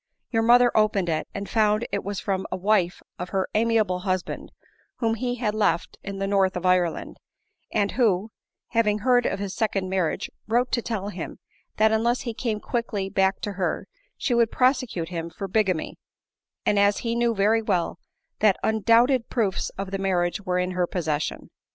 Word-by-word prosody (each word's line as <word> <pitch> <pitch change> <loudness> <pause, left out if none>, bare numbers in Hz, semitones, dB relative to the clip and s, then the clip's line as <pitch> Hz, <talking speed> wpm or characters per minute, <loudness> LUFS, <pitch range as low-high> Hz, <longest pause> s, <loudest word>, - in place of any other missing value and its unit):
Your 225 -2 +2
mother 240 +1 +5
opened 210 -4 +2
it, 155 -1 -1
and 200 0 -5
found 215 0 +2
it - - -1
was 200 -1 -3
from 190 -2 -2
a - - -1
wife 190 -2 +1 0.2
of 180 0 -4
her 190 -1 0
amiable 215 -4 +2
husband, 185 -1 -3 0.4
whom 225 -2 0
he 245 +2 -2
had 225 -4 -1
left 205 -6 0
in 195 0 -6
the 195 - -1
north 195 -1 +2
of 180 - -5
Ireland, 180 -2 +1 0.5
arid 200 -1 +1
who, 220 -4 +1 0.4
having 220 -3 +2
heard 245 +1 +3
of 195 - -1
his 200 -1 -4
second 195 -4 -1
marriage, 185 -4 0 0.2
wrote 240 +3 +1
to 235 - +1
tell 210 -4 -3
him, - - -6 0.4
that 215 0 +4
unless 235 +3 +1
he 235 - -4
came 220 -2 -2
quickly 210 -4 -2
back 190 0 +1
to 205 - -3
her, 190 -2 -2 0.3
she 250 - 0
would 235 -1 +3
prosecute 250 -11 +1
him 170 -2 -4
for 195 +3 -6
bigamy, 190 -5 0 0.7
as 200 0 +3
he 230 - 0
knew 235 -1 +1
very 215 +3 +3
well 175 -5 -1 0.4
that 210 -3 +4
undoubted 230 +3 +3
proofs 210 -6 0
of 195 0 -4
the 195 - -2
marriage 180 -1 0
were 180 -2 -1
in 180 0 0
her 180 -1 0
possession. 155 -5 -3
205 Hz, 180 wpm, -25 LUFS, 185-225 Hz, 0.7 s, mother